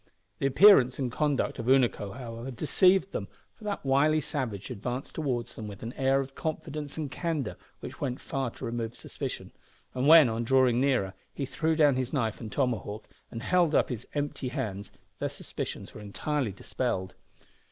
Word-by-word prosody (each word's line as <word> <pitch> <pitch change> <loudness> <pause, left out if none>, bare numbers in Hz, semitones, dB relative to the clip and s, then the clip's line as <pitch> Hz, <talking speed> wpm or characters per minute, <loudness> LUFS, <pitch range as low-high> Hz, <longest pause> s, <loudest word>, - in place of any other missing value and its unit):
The 135 - +2
appearance 135 -4 +7
and 130 -3 -2
conduct 145 0 0
of 115 - -4
Unaco, 120 -6 +2
however, 120 0 -6
deceived 185 - +3
them, - - -3 0.3
for 225 - -18
that 205 -7 -3
wily 145 +3 +4
savage 125 - -3
advanced 125 +6 -4
towards 130 -7 -2
them 110 - -6
with 100 -1 -9
an 115 +2 -5
air 135 0 +2
of 135 0 -7
confidence 155 -2 -4
and 150 -4 -3
candour 155 -4 -2 0.3
which - - -8
went 130 -3 -2
far 135 -2 -2
to 125 - -8
remove 115 -1 -3
suspicion, - - -6 0.4
and 130 +2 0
when, 160 -3 +9
on 115 0 -1
drawing 130 0 +4
nearer, 125 -9 +1 0.2
he 140 - -2
threw 160 +4 0
down 145 -4 +4
his 130 +1 -2
knife 115 -7 -1
and 110 -2 -6
tomahawk, 110 -3 -2 0.2
and 115 +1 -7
held 175 0 +3
up - - +3
his 125 -2 -5
empty 145 -2 -2
hands, 100 -5 -4 0.3
their - - -1
suspicions - - -6
were 105 - -9
entirely 125 +4 -2
dispelled. 95 -1 -3
130 Hz, 175 wpm, -29 LUFS, 115-145 Hz, 0.4 s, when